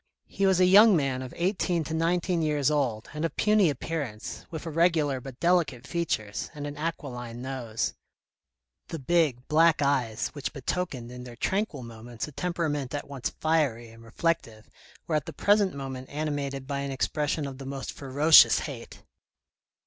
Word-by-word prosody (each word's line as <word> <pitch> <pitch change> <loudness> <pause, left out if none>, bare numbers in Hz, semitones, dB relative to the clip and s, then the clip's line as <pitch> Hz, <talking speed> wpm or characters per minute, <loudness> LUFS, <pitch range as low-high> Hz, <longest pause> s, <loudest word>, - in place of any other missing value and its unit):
He 195 0 0
was 190 -1 +3
a 185 - +6
young 205 +3 +8
man 135 -3 -1
of 130 -1 -7
eighteen 180 -2 0
to 160 - -5
nineteen 170 +1 +1
years 150 -2 +1
old, 125 -7 0
and 150 +1 -4
of 165 - -2
puny 210 -4 +4
appearance, 140 -6 -5
with 160 0 -7
irregular 160 -4 +2
but 130 -1 -10
delicate 170 -8 +1
features, 110 -12 -2
and 145 -1 -5
an 145 0 -5
aquiline 125 -7 -5
nose. 125 -4 -3 0.9
The 165 - -5
big 145 -4 +1
black 160 0 +4
eyes 130 -6 0
which 145 -2 -5
betokened 135 -4 -3
in 125 0 -8
their 120 -1 -10
tranquil 190 - -1
moments 115 +1 -7
a - - -9
temperament 150 -4 -2
at 145 - -5
once 140 -3 -3
fiery 145 -8 +1
and 115 0 -15
reflective 115 -3 -2 0.3
were 165 - -3
at 150 - -4
the - - -6
present 205 -4 +2
moment 130 -2 -6
animated 145 -2 -3
by 140 0 -3
an 140 0 -3
expression 145 +2 -1
of 135 -1 -7
the 135 - -7
most 135 0 -5
ferocious 145 +4 +6
hate. 135 -7 -8
145 Hz, 165 wpm, -27 LUFS, 130-165 Hz, 0.9 s, young